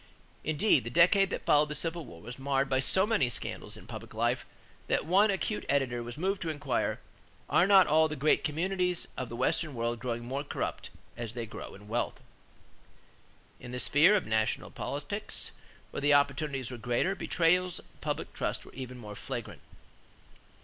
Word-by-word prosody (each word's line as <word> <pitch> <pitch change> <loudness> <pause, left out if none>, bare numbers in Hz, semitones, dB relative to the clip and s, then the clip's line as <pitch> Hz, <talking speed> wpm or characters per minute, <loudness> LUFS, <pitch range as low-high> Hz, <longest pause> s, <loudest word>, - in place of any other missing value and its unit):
Indeed, 155 - +3
the 115 - -4
decade 180 - +5
that - - -4
followed 150 0 +4
the 150 - -3
Civil 165 +1 -3
War 85 +2 -12
was 125 +4 -8
marred 135 0 +1
by 130 -1 +1
so 190 +8 +4
many 210 - +2
scandals 120 - -3
in - - -13
public - - -9
life - - 0 0.4
that - - +1
one 195 +6 +4
acute 200 +2 -1
editor 130 -4 +1
was 120 +2 -7
moved 190 +4 -1
to 165 - -1
inquire: 155 -2 -1 0.5
"Are 180 - +4
not 195 -2 +8
all 160 +1 +4
the 155 - -4
great 150 +2 +2
communities 180 +3 0
of 130 - -4
the 115 - -6
Western 135 +4 0
World 115 0 -1
growing 120 -1 -3
more 135 +3 -3
corrupt 145 - -4 0.3
as 115 -1 -6
they 120 -1 -3
grow 110 - -8
in 105 +1 -14
wealth?" 120 +3 -2 1.4
In 125 0 -9
the 125 - -3
sphere 160 +11 +5
of 205 - +1
national 110 0 0
politics, - - -1 0.4
where - - -4
the 145 0 +5
opportunities 140 -2 +1
were 125 - -6
greater, 120 - +1
betrayals 180 -1 +2
of - - -16
public - - -3
trust - - -3
were - - -14
even 125 -1 -7
more 105 -4 -8
flagrant. - - -6
140 Hz, 180 wpm, -30 LUFS, 120-175 Hz, 1.4 s, not